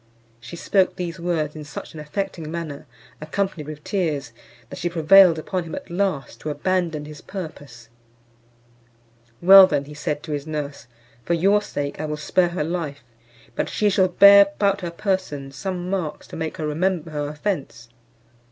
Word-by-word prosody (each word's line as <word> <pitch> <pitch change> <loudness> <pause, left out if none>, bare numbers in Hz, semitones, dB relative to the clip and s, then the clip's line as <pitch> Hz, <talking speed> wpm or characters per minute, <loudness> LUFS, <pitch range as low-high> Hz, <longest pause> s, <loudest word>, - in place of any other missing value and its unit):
She 120 +7 -10
spoke 185 +2 +1
these 175 -3 -5
words 165 -3 -2
in 155 - -7
such 145 - -9
an 160 - -9
affecting 165 +1 -4
manner, 160 -3 -6 0.3
accompanied 155 -1 -3
with 150 -1 -8
tears, 155 - -2 0.4
that - - -7
she 175 - -1
prevailed 170 +1 +6
upon 180 +3 -3
him 160 - -6
at - - -9
last 170 -11 -2
to 155 - -4
abandon 160 0 -1
his 150 -1 -10
purpose, 145 - -9 1.6
"Well 190 +1 +10
then," 145 -3 -1
said 150 0 -2
he - - -22
to 155 - -7
his 145 0 -3
nurse, 145 -4 -5 0.4
"for 170 - 0
your 200 +5 +3
sake 145 -8 -4
I - - -2
will 150 0 -3
spare 175 +4 +1
her 175 -3 -2
life; 155 -4 -4 0.5
but - - -1
she 210 -1 +1
shall 190 -1 +3
bear 200 +2 +8
about 200 -1 +1
her 175 - -3
person 170 -7 -3
some 180 +4 -5
marks 180 -6 -3
to - - -8
make 160 -1 -4
her 155 - -3
remember 165 +1 -1
her 145 -1 -3
offence." 150 - -4
165 Hz, 170 wpm, -23 LUFS, 150-185 Hz, 1.6 s, Well